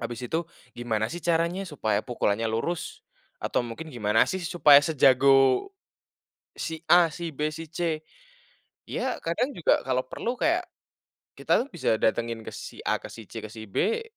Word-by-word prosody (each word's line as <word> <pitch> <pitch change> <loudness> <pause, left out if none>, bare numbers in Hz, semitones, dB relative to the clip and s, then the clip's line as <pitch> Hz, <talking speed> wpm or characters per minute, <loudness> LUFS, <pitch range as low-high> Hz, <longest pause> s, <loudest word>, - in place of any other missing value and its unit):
habis 120 0 -5
itu 165 +5 -2 0.2
gimana 115 0 -2
sih 175 - -5
caranya 170 +3 +1
supaya 110 -9 0
pukulannya 115 -2 -1
lurus, 140 +10 -3 0.3
atau - - -1
mungkin 125 +6 -7
gimana 105 -2 +3
sih 190 - -3
supaya 155 -4 +6
sejago 135 - +4 0.9
si 160 0 -6
A 175 -1 +6
si 165 0 -6
B 150 +2 -1
si 165 +1 -7
C? 160 0 -3 0.8
Ya, - - -2
kadang 240 +12 -1
juga 170 - +1
kalau 130 -1 +1
perlu 235 - -3
kayak, 345 +3 +2 0.8
kita - - +2
tuh - - -12
bisa 165 -10 +1
datengin 115 +1 -1
ke - - -8
si - - -9
A, - - 0
ke - - -9
si 115 - -10
C 115 - -5
ke 110 - -7
si 110 0 -10
B, 195 - 0
150 Hz, 165 wpm, -26 LUFS, 115-170 Hz, 0.9 s, supaya